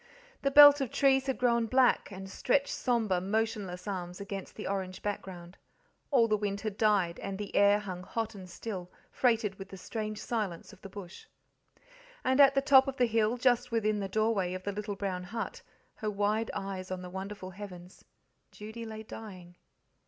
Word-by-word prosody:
The 275 - +2
belt 290 0 +9
of 265 - -1
trees 270 +1 +3
had 265 - 0
grown 235 -2 +2
black, 255 +2 +3
and 190 0 -7
stretched 270 +8 +1
sombre, 225 -8 0
motionless 205 -2 -2
arms 180 -3 -4
against 200 -1 -6
the - - -7
orange 190 -1 -3
background. 185 -3 -5 0.5
All 245 -5 +4
the 215 - +2
wind 200 -1 -2
had 215 -2 -3
died, 200 -6 +2
and 195 -1 -5
the 205 -1 -6
air 200 0 +6
hung 190 -4 -6
hot 225 +4 -3
and 185 -3 -10
still, 180 -1 -6 0.2
freighted 225 -5 +1
with 195 0 -8
the 190 - -9
strange 215 +2 -5
silence 210 -6 -3
of 200 - -17
the 195 - -9
bush. 195 - -10 1.0
And 260 +2 +4
at 275 0 +7
the 275 - +2
top 270 -1 +6
of 270 0 -3
the 250 - +4
hill, 225 0 +1
just 245 0 +2
within 215 -2 +1
the 195 -1 -3
doorway 200 -3 +1
of 185 - -7
the 200 - -2
little 205 0 -4
brown 190 -2 -3
hut, 225 +5 -5 0.4
her 215 - -2
wide 210 +2 0
eyes 195 -1 -5
on 185 -1 -4
the 180 - -7
wonderful 190 0 -6
heavens, 185 -2 -10 0.5
Judy 220 +2 -8
lay 220 0 -7
dying. 185 -6 -10
210 Hz, 185 wpm, -30 LUFS, 190-230 Hz, 1.0 s, belt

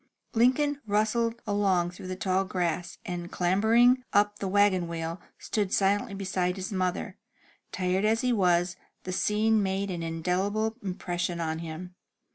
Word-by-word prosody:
Lincoln 275 +5 +2
rustled 225 +3 +1
along 195 -4 +1
through 180 - -10
the 185 - -3
tall 190 0 +1
grass, 175 -2 -2
and, 175 -1 -5
clambering 225 +8 +4
up 205 0 +3
the 195 - -2
wagon 190 -2 +3
wheel, 165 +1 -4 0.2
stood 205 -3 -2
silently 200 0 +1
beside 185 -2 -1
his 190 +1 -5
mother. 185 -1 -2 0.5
Tired 185 +1 0
as 220 +1 +2
he 250 -1 +2
was, 180 -3 +2 0.3
the 185 - -4
scene 215 +3 +2
made 195 0 -1
an 175 -2 -4
indelible 185 +7 -1
impression 175 -2 -3
on 160 -1 -2
him. 165 +2 -7
190 Hz, 145 wpm, -28 LUFS, 180-210 Hz, 0.5 s, clambering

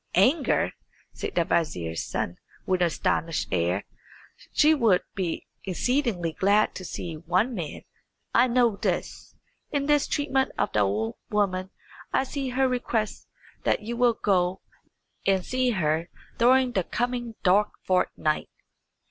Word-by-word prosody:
"Anger?" 280 +2 +3 0.4
said - - -5
the 170 - +3
vizier's 85 - -1
son, 85 - -3 0.3
with 185 -1 +1
an 175 - +5
astonished 165 0 -1
air. 90 +2 0 0.7
"She 305 +1 +5
would 225 -11 +3
be 180 -4 -3 0.2
exceedingly 195 - 0
glad 205 +5 +3
to 185 - -7
see 165 -2 -5
one 180 +10 +1
man. 170 -9 -5 0.5
I 240 +2 +5
know 240 -4 +3
this. - - -3 0.3
In 285 -2 -1
this 295 -1 +3
treatment 270 -3 0
of - - 0
the 105 - +2
old 105 +3 0
woman 190 -3 0 0.4
I - - +2
see 270 0 -3
her 260 +1 +2
request 240 -4 -2 0.4
that - - +1
you 235 +2 -4
will 240 -1 +3
go 185 -3 +1 0.6
and 190 -2 +2
see 255 0 +1
her 165 -5 0 0.3
during 255 +2 +5
the 190 -6 0
coming 240 +2 -2
dark 205 +3 +4
fortnight." 180 -4 0
200 Hz, 140 wpm, -26 LUFS, 170-250 Hz, 0.7 s, an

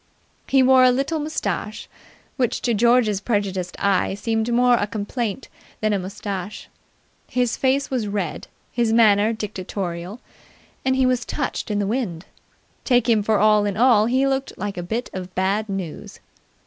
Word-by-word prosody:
He 270 -1 +4
wore 260 0 +6
a 255 - +7
little 275 +6 0
moustache, 215 - -3 0.5
which 250 -4 -1
to 240 - +1
George's 225 -2 +3
prejudiced 195 -5 -2
eye 195 -1 +1
seemed 225 +2 -1
more 245 +1 +4
a 210 -3 +2
complaint 215 +3 -4 0.3
than 215 -1 +1
a 200 - +1
moustache. 195 +1 -6 0.6
His 245 -1 0
face 270 +1 0
was 245 -5 -1
red, 200 -6 -3 0.2
his 235 -2 +1
manner 215 -2 +4
dictatorial, 190 -2 -5 0.6
and 260 0 +1
he 260 0 +3
was 250 -1 +1
touched - - -3
in 210 - -1
the 205 - 0
wind. 195 -7 -3 0.6
Take 245 -3 +2
him 225 -3 +4
for 215 +1 +1
all 210 0 +4
in 200 -1 -2
all 225 -3 +5
he 260 +3 +2
looked 270 0 -2
like 205 0 -4
a 175 - -4
bit 220 +8 -4
of 185 -1 -7
bad 200 +3 0
news. 190 -5 -6
215 Hz, 160 wpm, -22 LUFS, 200-245 Hz, 0.6 s, a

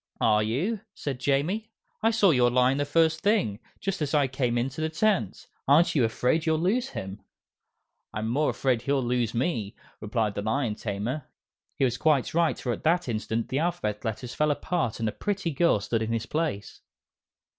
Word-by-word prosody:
"Are 105 -1 +4
you?" 150 - -1 0.2
said 135 -4 -4
Jamie. 155 - 0 0.3
"I 225 - +4
saw 215 -5 +4
your 125 -4 +4
lion 125 +2 +3
the 145 - +1
first 160 +2 +2
thing 200 - +1 0.2
just 195 -3 -3
as 150 0 0
I 145 -2 +4
came 125 -2 -1
into 135 +5 -2
the 160 - 0
tent. 160 - 0 0.2
Aren't 150 +5 +5
you 140 - +3
afraid 125 +7 +1
you'll 160 0 +3
lose 225 +11 +1
him?" 95 - -7 0.9
"I'm 110 +1 -3
more 140 +7 +1
afraid 125 -4 0
he'll 140 +1 0
lose 120 -2 0
me," 115 - -1 0.2
replied 110 -1 -1
the 100 - -3
Lion 110 +2 0
Tamer. 110 +7 -4 0.5
He 135 - +3
was 125 -1 -1
quite 150 -5 +2
right, 170 0 +2
for 125 - -3
at - - -7
that 170 +1 +2
instant 115 0 -2
the 135 - 0
Alphabet 155 -12 -2
Letters 120 +2 -4
fell 150 0 +1
apart 145 -5 -1
and 115 - 0
a - - 0
pretty 200 - -2
girl 150 -5 +3
stood 110 +3 -1
in 110 0 -2
his 115 0 -1
place. 150 -11 -3
135 Hz, 190 wpm, -27 LUFS, 115-160 Hz, 0.9 s, Aren't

